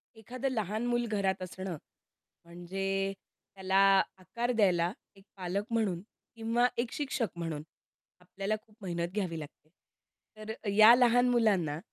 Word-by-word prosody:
एखादं 250 Hz, +5 st, -4 dB
लहान 220 Hz, -1 st, -2 dB
मूल 240 Hz, 0 st, +1 dB
घरात 195 Hz, -3 st, 0 dB
असणं 185 Hz, -1 st, -5 dB, 0.7 s
म्हणजे 195 Hz, +3 st, -3 dB, 0.4 s
त्याला 190 Hz, 0 st, -2 dB, 0.4 s
आकार 235 Hz, +7 st, -3 dB
द्यायला 180 Hz, -7 st, +3 dB, 0.2 s
एक 195 Hz, -, -18 dB
पालक 185 Hz, +2 st, -2 dB
म्हणून 205 Hz, -7 st, 0 dB, 0.3 s
किंवा 230 Hz, +2 st, +2 dB
एक 235 Hz, 0 st, -1 dB
शिक्षक 275 Hz, -6 st, -1 dB
म्हणून 165 Hz, -3 st, -4 dB, 0.6 s
आपल्याला 195 Hz, +3 st, -3 dB
खूप 215 Hz, -1 st, -26 dB
मेहनत 170 Hz, -3 st, -2 dB
घ्यावी 185 Hz, -6 st, -2 dB
लागते. 155 Hz, 0 st, -12 dB, 0.7 s
तर 215 Hz, +1 st, -6 dB, 0.2 s
या 215 Hz, +3 st, +9 dB
लहान 245 Hz, 0 st, +4 dB
मुलांना 195 Hz, -11 st, +2 dB
195 Hz, 125 wpm, -31 LUFS, 180-230 Hz, 0.7 s, या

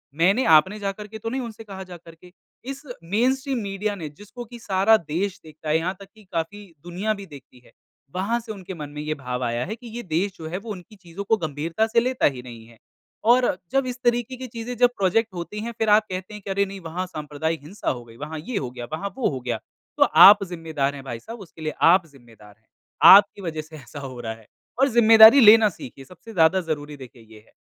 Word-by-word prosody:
मैंने, 195 Hz, +10 st, +3 dB
आपने 170 Hz, +7 st, +4 dB
जाकर 205 Hz, +1 st, -5 dB
के 220 Hz, +1 st, -10 dB
तो 225 Hz, -, -4 dB
नहीं 260 Hz, +3 st, -3 dB
उनसे 225 Hz, -2 st, -8 dB
कहा 195 Hz, -3 st, -9 dB
जाकर 175 Hz, -2 st, -13 dB, 0.5 s
इस 275 Hz, +1 st, -6 dB, 0.2 s
मेनस्ट्रीम 255 Hz, -, 0 dB
मीडिया 200 Hz, +1 st, -3 dB
ने 160 Hz, -5 st, -7 dB
जिसको 210 Hz, +10 st, -11 dB
कि 240 Hz, +1 st, -12 dB
सारा 200 Hz, +2 st, +3 dB
देश 175 Hz, +4 st, -3 dB
देखता 155 Hz, 0 st, -9 dB
है, 155 Hz, -, +3 dB
यहाँ 180 Hz, +4 st, -2 dB
तक 195 Hz, -, -12 dB
कि 215 Hz, -, -18 dB
काफ़ी 205 Hz, +6 st, -4 dB, 0.2 s
दुनिया 185 Hz, +5 st, -2 dB
भी 200 Hz, -2 st, -9 dB
देखती 140 Hz, -6 st, -15 dB
है -, -, -20 dB, 0.4 s
वहाँ 205 Hz, +6 st, 0 dB
से 230 Hz, -1 st, -9 dB
उनके 190 Hz, -2 st, -8 dB
मन 150 Hz, -3 st, -7 dB
में 150 Hz, -, -5 dB
ये 155 Hz, +1 st, -2 dB
भाव 125 Hz, -2 st, -5 dB
आया 120 Hz, 0 st, -1 dB
है 210 Hz, +6 st, -5 dB
कि 235 Hz, +1 st, -13 dB
ये 235 Hz, +2 st, -6 dB
देश 180 Hz, +3 st, -1 dB
जो 160 Hz, -, -8 dB
है 180 Hz, -, -3 dB
वो 225 Hz, -, -6 dB
उनकी 190 Hz, +2 st, -10 dB
चीज़ों 190 Hz, +1 st, -9 dB
को 220 Hz, +2 st, +2 dB
गंभीरता 160 Hz, +5 st, -2 dB
से 230 Hz, +1 st, +3 dB
लेता 255 Hz, +2 st, 0 dB
ही 125 Hz, -, -8 dB
नहीं 115 Hz, -2 st, -11 dB
है। 115 Hz, -1 st, -19 dB, 0.5 s
और 250 Hz, 0 st, +4 dB, 0.3 s
जब 270 Hz, -1 st, +1 dB
इस 250 Hz, -, -4 dB
तरीक़े 240 Hz, +1 st, 0 dB
की 260 Hz, 0 st, -7 dB
चीज़ें 230 Hz, +1 st, -6 dB
जब 245 Hz, +1 st, +5 dB
प्रोज़ेक्ट 200 Hz, +2 st, +1 dB
होती 180 Hz, +4 st, -6 dB
हैं 235 Hz, -, -4 dB
फ़िर 220 Hz, -, +1 dB
आप 210 Hz, +1 st, +5 dB
कहते 185 Hz, +3 st, -6 dB
हैं 210 Hz, -, -9 dB
अरे 200 Hz, +1 st, +1 dB
नहीं 195 Hz, 0 st, -9 dB
वहाँ 180 Hz, +3 st, -4 dB
सांप्रदायिक 155 Hz, 0 st, -4 dB
हिंसा 185 Hz, +8 st, -5 dB
हो 120 Hz, -2 st, -4 dB
गई, 115 Hz, 0 st, -16 dB
वहाँ 150 Hz, +3 st, -6 dB
ये 200 Hz, +8 st, -5 dB
हो 130 Hz, -7 st, -3 dB
गया, 120 Hz, -1 st, -7 dB
वहाँ 200 Hz, +5 st, -3 dB
वो 260 Hz, -, +1 dB
हो 135 Hz, -, -4 dB
गया। 120 Hz, -2 st, -2 dB, 0.4 s
तो -, -, +6 dB, 0.2 s
आप 200 Hz, +1 st, +8 dB
ज़िम्मेदार 160 Hz, -5 st, -3 dB
हैं 135 Hz, -, -9 dB
भाई 120 Hz, -4 st, -6 dB
साहब 230 Hz, -, -10 dB
उसके 170 Hz, -4 st, -13 dB
लिए, 155 Hz, -, -3 dB
आप 175 Hz, +2 st, +5 dB
ज़िम्मेदार 115 Hz, -7 st, -18 dB
हैं। 110 Hz, -, -40 dB, 0.5 s
आपकी 200 Hz, 0 st, +3 dB
वज़ह 160 Hz, -4 st, -4 dB
से 155 Hz, +1 st, -14 dB
ऐसा 135 Hz, +1 st, -11 dB
हो 130 Hz, -3 st, -8 dB
रहा 110 Hz, -2 st, -4 dB
है। 110 Hz, -1 st, -17 dB, 0.3 s
और 270 Hz, -, +5 dB
ज़िम्मेदारी 225 Hz, +1 st, +8 dB
लेना 220 Hz, -1 st, +8 dB
सीखिए 135 Hz, -5 st, -11 dB
सबसे 180 Hz, -, -14 dB
ज़्यादा 175 Hz, +2 st, +3 dB
ज़रूरी 145 Hz, -1 st, -5 dB
देखिए 125 Hz, -3 st, -13 dB
ये -, -, -13 dB
है -, -, -27 dB
185 Hz, 235 wpm, -23 LUFS, 150-220 Hz, 0.5 s, आप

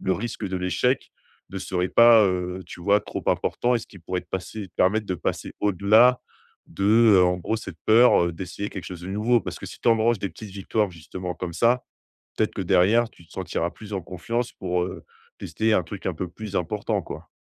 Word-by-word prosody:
le 95 Hz, -, 0 dB
risque 115 Hz, 0 st, -4 dB
de 95 Hz, -, -3 dB
l'échec 90 Hz, +8 st, 0 dB, 0.4 s
ne 95 Hz, -, -5 dB
serait 90 Hz, -1 st, -2 dB
pas, 115 Hz, -2 st, +7 dB
heu, 90 Hz, 0 st, -2 dB
tu -, -, -10 dB
vois, 100 Hz, +2 st, +4 dB
trop -, -, -6 dB
important 125 Hz, 0 st, +1 dB
et -, -, 0 dB
ce -, -, -10 dB
qui 95 Hz, -, -15 dB
pourrait 90 Hz, +2 st, -3 dB
te -, -, -30 dB
passer 95 Hz, +2 st, -5 dB
permettre 105 Hz, +3 st, +2 dB
de 95 Hz, -, -1 dB
passer -, -, -3 dB
au-delà 105 Hz, +5 st, +4 dB, 0.5 s
de, 100 Hz, -, -7 dB, 0.3 s
heu, 90 Hz, -, +6 dB
en 90 Hz, 0 st, +2 dB
gros, 110 Hz, +5 st, -2 dB
cette 95 Hz, -7 st, -8 dB
peur, 115 Hz, -5 st, +6 dB
heu, 85 Hz, -, -2 dB
d'essayer 95 Hz, +4 st, -6 dB
quelque 95 Hz, -5 st, -7 dB
chose 90 Hz, -2 st, -8 dB
de -, -, -7 dB
nouveau. 110 Hz, +4 st, +2 dB
Parce -, -, -6 dB
que -, -, -7 dB
si -, -, -10 dB
tu -, -, +1 dB
engranges 115 Hz, 0 st, +3 dB
des 100 Hz, -, -3 dB
petites 110 Hz, -2 st, -10 dB
victoires, 100 Hz, +1 st, -1 dB
justement, 90 Hz, +2 st, -6 dB
comme 90 Hz, -2 st, -5 dB
ça, 120 Hz, +6 st, +2 dB, 0.5 s
peut-être -, -, +1 dB
que -, -, -3 dB
derrière, 115 Hz, +6 st, +3 dB
tu 85 Hz, -, -20 dB
te -, -, -21 dB
sentiras 85 Hz, -, -2 dB
plus 105 Hz, -1 st, -12 dB
en 95 Hz, -, -1 dB
confiance 115 Hz, +8 st, -3 dB
pour, 90 Hz, -1 st, -2 dB
heu, -, -, -7 dB, 0.3 s
tester 110 Hz, 0 st, 0 dB
un 90 Hz, -, +3 dB
truc 95 Hz, +4 st, -8 dB
un 90 Hz, -, -1 dB
peu 90 Hz, +3 st, -4 dB
plus 100 Hz, +2 st, -7 dB
important, 100 Hz, +4 st, -1 dB
quoi. -, -, -9 dB
100 Hz, 220 wpm, -24 LUFS, 90-110 Hz, 0.5 s, pas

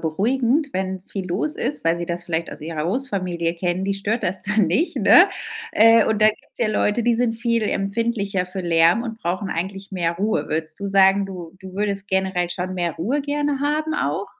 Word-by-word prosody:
beruhigend, 240 Hz, -, +1 dB
wenn 190 Hz, 0 st, -3 dB
viel 195 Hz, -2 st, -5 dB
los 215 Hz, -, -1 dB
ist, 285 Hz, -, -3 dB
weil 165 Hz, +1 st, +2 dB
sie 170 Hz, 0 st, -4 dB
das 175 Hz, 0 st, -4 dB
vielleicht 165 Hz, 0 st, -2 dB
aus -, -, -10 dB
ihrer 155 Hz, 0 st, -4 dB
Großfamilie 185 Hz, -6 st, -2 dB
kennen. 175 Hz, +2 st, -2 dB
Die 200 Hz, -, 0 dB
stört 205 Hz, +4 st, -2 dB
das 185 Hz, +1 st, -2 dB
dann 210 Hz, -1 st, +2 dB
nicht, 320 Hz, -, 0 dB
ne? -, -, +7 dB, 0.4 s
Äh, 225 Hz, -, +6 dB
und 220 Hz, -1 st, 0 dB
da 215 Hz, -, +7 dB
gibt's 215 Hz, -, -6 dB
ja 235 Hz, -, +2 dB
Leute, 215 Hz, +1 st, +1 dB
die 240 Hz, 0 st, +3 dB
sind 230 Hz, -1 st, +1 dB
viel 230 Hz, -1 st, 0 dB
empfindlicher 200 Hz, -2 st, -1 dB
für 190 Hz, +1 st, -5 dB
Lärm 170 Hz, +6 st, +3 dB
und 225 Hz, -2 st, -6 dB
brauchen 185 Hz, +3 st, -2 dB
eigentlich 195 Hz, +3 st, -4 dB
mehr 170 Hz, -3 st, 0 dB
Ruhe. 215 Hz, +4 st, -1 dB
Würdest 155 Hz, +2 st, -3 dB
du 200 Hz, -, -3 dB
sagen, 195 Hz, 0 st, +4 dB
du 180 Hz, -3 st, -8 dB
du 190 Hz, -1 st, -10 dB
würdest 200 Hz, -1 st, -2 dB
generell 190 Hz, -2 st, 0 dB
schon 185 Hz, +1 st, -4 dB
mehr 175 Hz, -3 st, -1 dB
Ruhe 255 Hz, -, -1 dB
gerne 290 Hz, -1 st, -1 dB
haben 305 Hz, +2 st, 0 dB
auch? 150 Hz, -, -1 dB
195 Hz, 205 wpm, -22 LUFS, 175-225 Hz, 0.4 s, ne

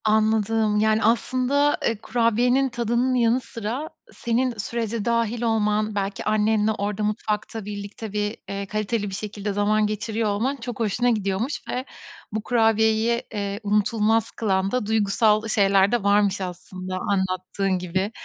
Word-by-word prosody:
Anladım. 215 Hz, 0 st, +2 dB
Yani, 220 Hz, +1 st, +2 dB
aslında, 255 Hz, +5 st, +2 dB
eee, 230 Hz, -, +1 dB
kurabiyenin 245 Hz, +4 st, +2 dB
tadının 240 Hz, +1 st, 0 dB
yanı 240 Hz, 0 st, +3 dB
sıra 240 Hz, +7 st, -5 dB, 0.2 s
senin 245 Hz, +2 st, 0 dB
sürece 225 Hz, 0 st, -3 dB
dâhil 230 Hz, 0 st, 0 dB
olman, 215 Hz, -2 st, +1 dB
belki 200 Hz, 0 st, -2 dB
annenle 215 Hz, 0 st, +2 dB
orada 210 Hz, 0 st, -2 dB
mutfakta 215 Hz, 0 st, -2 dB
birlikte 205 Hz, +1 st, -7 dB
bir, 210 Hz, +1 st, -1 dB
eee, 200 Hz, 0 st, -3 dB
kaliteli 215 Hz, +1 st, -2 dB
bir 190 Hz, -, -5 dB
şekilde 205 Hz, 0 st, -4 dB
zaman 210 Hz, +1 st, +2 dB
geçiriyor 215 Hz, +1 st, -2 dB
olman 230 Hz, +7 st, 0 dB
çok 245 Hz, -3 st, -7 dB
hoşuna 230 Hz, +2 st, +1 dB
gidiyormuş 215 Hz, +4 st, -1 dB
ve 255 Hz, +1 st, -2 dB, 0.5 s
bu 215 Hz, 0 st, -3 dB
kurabiyeyi, 225 Hz, 0 st, +2 dB
eee, 200 Hz, -1 st, -3 dB
unutulmaz 210 Hz, +2 st, +1 dB
kılan 195 Hz, -3 st, 0 dB
da 250 Hz, -4 st, 0 dB
duygusal 215 Hz, 0 st, +2 dB
şeyler 195 Hz, -2 st, +3 dB
de 240 Hz, -4 st, +1 dB
varmış 200 Hz, -1 st, +3 dB
aslında 185 Hz, 0 st, -6 dB
anlattığın 190 Hz, -1 st, -1 dB
gibi. 185 Hz, +3 st, -2 dB
215 Hz, 140 wpm, -24 LUFS, 205-230 Hz, 0.5 s, yanı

